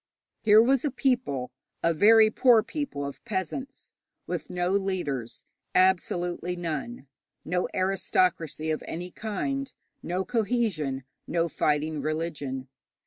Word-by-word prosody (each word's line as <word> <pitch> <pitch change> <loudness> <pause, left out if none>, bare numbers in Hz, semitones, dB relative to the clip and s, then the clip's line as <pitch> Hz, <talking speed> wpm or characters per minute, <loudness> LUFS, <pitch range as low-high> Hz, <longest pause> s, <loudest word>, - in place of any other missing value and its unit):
Here 215 -1 +7
was 265 +1 +3
a 295 - +1
people 240 - 0 0.3
a 170 - +3
very 215 +5 +6
poor 235 -2 +5
people 250 - -4
of 140 - -7
peasants 235 - -5 0.3
with - - -4
no 180 0 -1
leaders, 180 - -2 0.3
absolutely 180 -1 +2
none; 170 - -4 0.4
no 180 +2 0
aristocracy 180 -4 +1
of 155 - -2
any 175 +2 -5
kind, 270 +8 -3 0.3
no 185 +2 -2
cohesion, 205 - 0 0.2
no 170 -1 +1
fighting 150 -1 0
religion. 150 -4 -3
180 Hz, 115 wpm, -27 LUFS, 155-220 Hz, 0.4 s, Here